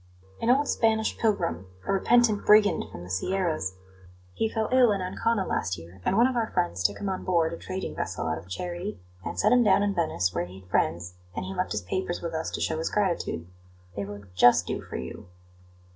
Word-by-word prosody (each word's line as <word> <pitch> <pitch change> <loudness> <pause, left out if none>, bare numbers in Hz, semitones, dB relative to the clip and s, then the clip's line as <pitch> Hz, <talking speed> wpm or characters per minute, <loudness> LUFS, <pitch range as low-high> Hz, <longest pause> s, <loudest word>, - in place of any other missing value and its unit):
"An 230 - +1
old 275 +3 +4
Spanish 220 -1 +1
pilgrim 95 - 0 0.2
a - - 0
repentant 220 +1 +3
brigand 210 -1 +5
from 85 - -8
the 90 - -10
Sierras. 155 - -1 0.6
He 225 - 0
fell 220 -1 -1
ill 255 -3 +6
in 200 - 0
Ancona 190 +3 0
last 90 +2 -1
year, 85 +3 -13
and 195 - +1
one 235 - +6
of 260 0 +1
our 230 -2 0
friends 85 +1 -1
took 100 +2 +2
him 200 - -4
on 190 -1 -2
board 170 -3 +2
a - - -5
trading 185 +1 -5
vessel - - -3
out 80 0 -1
of 85 +3 -15
charity, 175 - -4 0.2
and 85 - -5
set - - +4
him 245 -1 +6
down 205 -1 +4
in 205 -1 +1
Venice, 90 - 0
where 85 - -1
he 95 +2 -12
had 90 - -21
friends, 85 +2 0 0.2
and - - -3
he 190 - -5
left 185 0 -2
his 105 -1 -2
papers 175 - -2
with 170 -1 -5
us 160 0 -2
to - - -5
show 160 -1 0
his 160 - -1
gratitude. 185 - -1 0.5
They 100 - -2
will 100 0 -8
just 120 +7 +6
do - - -3
for - - -9
you." - - -7
175 Hz, 220 wpm, -27 LUFS, -, 0.6 s, ill